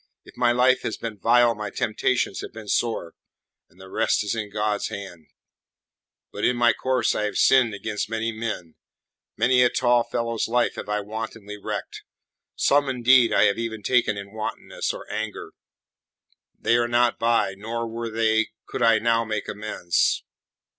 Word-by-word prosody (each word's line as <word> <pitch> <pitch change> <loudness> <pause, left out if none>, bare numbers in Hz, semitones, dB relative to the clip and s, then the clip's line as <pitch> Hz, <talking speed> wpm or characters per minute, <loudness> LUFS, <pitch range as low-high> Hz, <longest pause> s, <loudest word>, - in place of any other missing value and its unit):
If - - -16
my 120 -1 +3
life 125 +1 +3
has 110 - -3
been 110 -3 -6
vile 120 +1 +4
my 105 -1 -5
temptations 110 -1 -1
have - - -8
been 110 -1 -10
sore, 110 -6 -1 0.6
and 90 - -25
the 95 - -12
rest 110 +2 +1
is 105 - -2
in 110 -2 -4
God's 105 0 -1
hands. 90 -6 -8 1.0
But - - -6
in 125 - +2
my 120 -1 +4
course 130 -3 0
I 105 - -1
have 105 - -3
sinned 125 -5 +4
against 105 +1 -4
many 115 0 -2
men; 110 -7 -5 0.6
many 125 0 +4
a 125 - +5
tall 120 -1 +2
fellow's 115 -1 -2
life 120 +1 +1
have - - -8
I 105 0 0
wantonly 105 0 -7
wrecked; - - -5 0.5
some, 140 0 +3
indeed, 125 -1 +4
I - - +4
have 100 - +2
even 110 -2 -4
taken 120 -3 +2
in 100 0 -8
wantonness 110 -1 -4
or - - -9
anger. 110 -1 -5 1.0
They 120 - +2
are 120 0 +1
not 120 0 +2
by, 115 -4 +2
nor, 115 +3 -4
were 115 +1 -5
they, 110 0 +1 0.2
could - - -6
I 115 -2 +5
now 115 0 +2
make 110 -2 -3
amends. 105 -5 0
115 Hz, 170 wpm, -24 LUFS, 105-120 Hz, 1.0 s, a